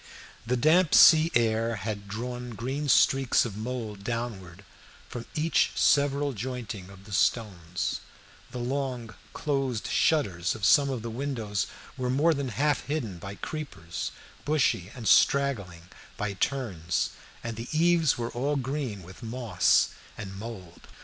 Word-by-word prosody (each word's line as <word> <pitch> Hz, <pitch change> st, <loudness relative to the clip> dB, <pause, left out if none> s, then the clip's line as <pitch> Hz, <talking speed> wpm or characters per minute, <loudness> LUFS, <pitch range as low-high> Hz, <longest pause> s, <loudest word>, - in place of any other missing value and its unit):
The 125 Hz, +2 st, +1 dB
damp 160 Hz, +6 st, +4 dB
sea 160 Hz, 0 st, +8 dB
air 115 Hz, 0 st, +2 dB
had 100 Hz, 0 st, -5 dB
drawn 120 Hz, +3 st, -5 dB
green 135 Hz, +6 st, -3 dB
streaks 135 Hz, -2 st, +4 dB
of 110 Hz, -5 st, -5 dB
mould 110 Hz, -3 st, -5 dB
downwards 100 Hz, -6 st, -5 dB, 0.4 s
from 120 Hz, -1 st, -7 dB
each 160 Hz, +2 st, +2 dB
several 140 Hz, 0 st, +3 dB
jointing 115 Hz, -5 st, -5 dB
of 100 Hz, -1 st, -14 dB
the 105 Hz, -, -13 dB
stones; 90 Hz, -3 st, 0 dB, 0.5 s
the -, -, -7 dB
long 125 Hz, -2 st, -3 dB, 0.2 s
closed 135 Hz, -7 st, -1 dB
shutters 100 Hz, -, +1 dB
of 105 Hz, -3 st, -2 dB
some 140 Hz, +5 st, +5 dB
of 125 Hz, -4 st, -3 dB
the 115 Hz, -, -4 dB
windows 115 Hz, -, -2 dB, 0.3 s
were 125 Hz, -1 st, -2 dB
more 150 Hz, +6 st, +3 dB
than 140 Hz, -3 st, -3 dB
half 145 Hz, +3 st, 0 dB
hidden 120 Hz, -, -3 dB
by 100 Hz, +3 st, -7 dB
creepers, 100 Hz, -, -5 dB, 0.3 s
bushy 135 Hz, -, +1 dB
and 120 Hz, -4 st, -5 dB
straggling 105 Hz, -12 st, +3 dB, 0.3 s
by 105 Hz, -1 st, -2 dB
turns, 95 Hz, -, -1 dB, 0.3 s
and 115 Hz, -1 st, -4 dB
the 115 Hz, +2 st, -7 dB
eaves 165 Hz, -1 st, +3 dB
were 120 Hz, 0 st, -3 dB
all 140 Hz, +5 st, -1 dB
green 130 Hz, -, -3 dB
with 90 Hz, +6 st, -13 dB
moss 115 Hz, -4 st, +2 dB, 0.3 s
and 95 Hz, -3 st, -7 dB
mould. 100 Hz, -5 st, -9 dB
120 Hz, 140 wpm, -28 LUFS, 100-140 Hz, 0.5 s, sea